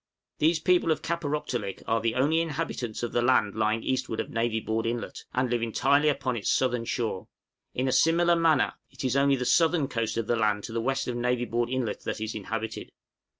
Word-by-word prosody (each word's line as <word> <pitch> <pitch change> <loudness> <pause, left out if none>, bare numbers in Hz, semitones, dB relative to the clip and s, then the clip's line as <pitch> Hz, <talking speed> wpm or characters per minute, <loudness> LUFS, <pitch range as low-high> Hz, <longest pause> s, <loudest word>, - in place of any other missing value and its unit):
These 160 +2 +3
people 175 -1 +3
of 155 - -1
Kaparōktolik 145 - -3
are 115 0 +1
the 115 0 0
only 150 +6 +2
inhabitants 145 -8 -3
of 120 - -2
the 120 - +1
land 120 -5 +3
lying 110 +1 0
eastward 130 -4 -2
of - - -3
Navy 115 -1 0
Board 110 +1 -2
Inlet, 120 0 -4
and 125 +1 0
live 120 -1 -1
entirely 140 +6 +2
upon 135 -3 -1
its 105 - -2
southern 125 -2 +1
shore. 115 -6 -2 0.5
In 130 +1 0
a - - +1
similar 170 +4 +4
manner, 165 -5 +3 0.2
it - - -9
is 130 -1 0
only 140 0 +4
the 125 -1 -3
southern 160 +3 +3
coast 115 -3 -2
of 115 - -1
the 120 - +1
land 105 -2 +1
to - - -6
the 115 - -1
west 135 +3 -1
of 125 - -2
Navy 120 0 0
Board 120 0 -1
Inlet 130 -3 -2
that - - -3
is 110 0 -3
inhabited. 110 +2 -5
125 Hz, 210 wpm, -27 LUFS, 115-140 Hz, 0.5 s, similar